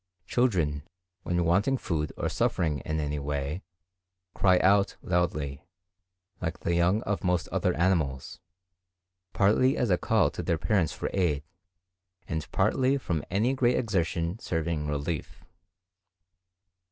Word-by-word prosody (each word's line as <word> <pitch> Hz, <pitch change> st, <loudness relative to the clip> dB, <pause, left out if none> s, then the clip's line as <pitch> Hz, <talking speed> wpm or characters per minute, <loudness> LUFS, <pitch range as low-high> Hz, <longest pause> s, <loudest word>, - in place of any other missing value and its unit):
Children, 90 Hz, -, +1 dB, 0.4 s
when 85 Hz, -1 st, 0 dB
wanting 100 Hz, +11 st, +2 dB
food 75 Hz, -, -2 dB
or -, -, -1 dB
suffering 75 Hz, -4 st, 0 dB
in 80 Hz, +4 st, -3 dB
any 75 Hz, -1 st, -2 dB
way, 70 Hz, +4 st, -3 dB, 0.7 s
cry 95 Hz, -2 st, +4 dB
out 100 Hz, +2 st, +3 dB
loudly, 75 Hz, -6 st, -1 dB, 0.8 s
like 80 Hz, -1 st, -3 dB
the 85 Hz, -, 0 dB
young 90 Hz, +6 st, +2 dB
of 100 Hz, 0 st, -2 dB
most 90 Hz, -2 st, +1 dB
other -, -, 0 dB
animals, 80 Hz, -8 st, 0 dB, 0.9 s
partly 110 Hz, +7 st, +3 dB
as 120 Hz, -5 st, +1 dB
a 90 Hz, -, +3 dB
call -, -, +2 dB
to -, -, -5 dB
their 85 Hz, -, 0 dB
parents 90 Hz, -2 st, +1 dB
for -, -, -4 dB
aid, 80 Hz, -7 st, +1 dB, 0.8 s
and 80 Hz, -2 st, -4 dB
partly 130 Hz, +1 st, +2 dB
from 85 Hz, -, -2 dB
any 110 Hz, +8 st, +1 dB
great 125 Hz, -2 st, +2 dB
exertion 85 Hz, -3 st, -1 dB
serving 80 Hz, -4 st, -2 dB
relief. 75 Hz, +2 st, -4 dB
85 Hz, 130 wpm, -28 LUFS, 75-100 Hz, 0.9 s, cry